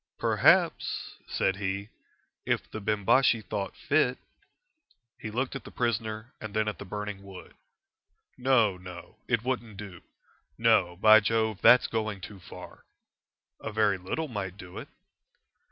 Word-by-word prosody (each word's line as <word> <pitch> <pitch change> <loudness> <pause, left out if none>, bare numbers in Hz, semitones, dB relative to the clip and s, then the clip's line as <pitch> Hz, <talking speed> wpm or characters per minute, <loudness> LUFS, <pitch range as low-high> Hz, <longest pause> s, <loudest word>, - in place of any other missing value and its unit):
"Perhaps," - - +2
said 95 -1 0
he, 100 +1 -3 0.5
"if - - -1
the 110 - -6
Bimbashi 110 +4 +3
thought 100 -2 -4
fit 135 -4 +1 0.5
" 130 - -41
He 110 - -4
looked 125 +5 -2
at 135 - -6
the - - -10
prisoner 115 -1 -2
and 110 -1 -7
then 110 0 +1
at 105 - -3
the - - -7
burning 105 0 -5
wood. 95 -2 -12 0.8
"No, 120 -7 +3
no; 90 -1 -11
it 115 -3 +1
wouldn't 120 -5 -3
do. 95 -4 -9 0.6
No, 90 0 +3
by 110 +4 +7
Jove, 110 -1 0
that's 125 - +7
going 110 -3 -2
too 100 +2 -10
far." 90 - -12 0.8
"A 110 - -5
very 105 -3 +2
little 155 - -3
might 100 -6 -5
do 90 -3 -9
it." - - -9
110 Hz, 145 wpm, -28 LUFS, 95-115 Hz, 0.8 s, by